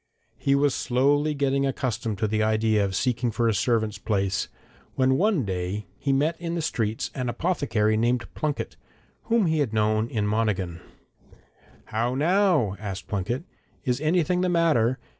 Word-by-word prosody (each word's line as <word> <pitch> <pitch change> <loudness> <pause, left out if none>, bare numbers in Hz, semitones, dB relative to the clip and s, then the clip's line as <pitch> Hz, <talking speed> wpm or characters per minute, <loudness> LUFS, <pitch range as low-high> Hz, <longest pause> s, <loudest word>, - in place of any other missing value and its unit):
He 140 - +2
was 140 -1 +3
slowly 145 +4 +1
getting 140 -1 +1
accustomed 120 -5 -2
to 110 - 0
the 110 +1 0
idea 110 -1 +2
of 95 -1 -2
seeking 120 +1 0
for 115 +1 0
a 115 - +3
servant's 110 0 0
place, 100 -1 0 0.5
when 130 0 +3
one 185 - +2
day 95 +2 -3
he 140 - 0
met 155 +5 +1
in 170 0 -3
the 170 - -1
streets 115 -8 -2
an 125 -2 -2
apothecary 120 -7 0
named 120 +1 +1
Plunket, 150 -2 -3 0.5
whom 230 -3 +2
he 160 -2 +1
had 130 -7 0
known 110 +1 +1
in 105 -3 -1
Monaghan. 100 -5 -1 1.0
'How 120 +3 -1
now?' 165 - +2
asked 100 -2 -6
Plunket. 105 - -2 0.4
'Is 125 +2 0
anything 175 +2 +2
the 185 - +1
matter? 150 -8 +2
120 Hz, 160 wpm, -25 LUFS, 110-145 Hz, 1.0 s, was